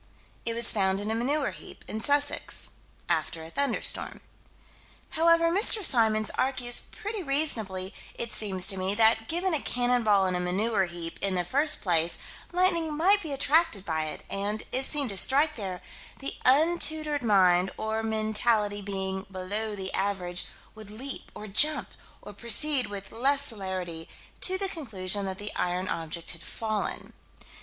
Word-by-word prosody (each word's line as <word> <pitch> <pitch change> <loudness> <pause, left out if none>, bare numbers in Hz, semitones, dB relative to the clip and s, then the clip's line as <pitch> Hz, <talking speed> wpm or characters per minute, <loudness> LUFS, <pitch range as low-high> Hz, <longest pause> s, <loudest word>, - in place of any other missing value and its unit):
It 230 - -2
was 235 0 +4
found 195 -2 +1
in 210 +2 -3
a - - +1
manure 270 +5 0
heap, - - -12
in 220 - -4
Sussex, 285 +4 +1 0.4
after 160 - -1
a 160 - -10
thunderstorm. 280 0 -1 0.9
However, 335 +1 +3
Mr. 405 +2 +5
Symons 220 -5 +2
argues 250 -2 0
pretty 425 0 -5
reasonably, 220 - -1 0.2
it 235 -2 -4
seems 190 -4 +1
to 195 -1 0
me, 190 +2 -1
that, 225 0 +3
given 350 +2 -1
a 300 - -1
cannon 245 0 +1
ball 205 -3 +3
in 185 - -1
a 180 - -1
manure 190 +4 0
heap, 170 -1 -7
in 195 -1 +1
the 180 -1 -1
first 295 - +2
place, 170 -2 +2 0.3
lightning 340 -4 +1
might 395 +6 +5
be 315 - -5
attracted 280 - +2
by 160 -2 -1
it, 155 - -5
and, 205 +2 -3
if 260 +1 +2
seen 290 -3 +1
to 195 - -3
strike 295 +8 +3
there, 190 -5 -5 0.3
the 275 - -3
untutored 310 +1 +3
mind, 190 -5 +4
or 220 0 -2
mentality 215 -1 +1
below 195 +2 -3
the 190 -1 -5
average, 185 -3 -1 0.3
would 215 -1 -11
leap 255 +6 -7
or 210 - -7
jump, 255 +2 +3 0.3
or 205 - -9
proceed 250 +4 +3
with 200 -1 -7
less 275 +4 +2
celerity, 185 - -5 0.3
to 375 0 +1
the 390 0 0
conclusion 205 - -3
that 190 0 -4
the 205 +1 -3
iron 180 +1 -2
object 165 -1 -4
had 170 - -10
fallen. 215 -2 -4
220 Hz, 160 wpm, -27 LUFS, 190-280 Hz, 0.9 s, Mr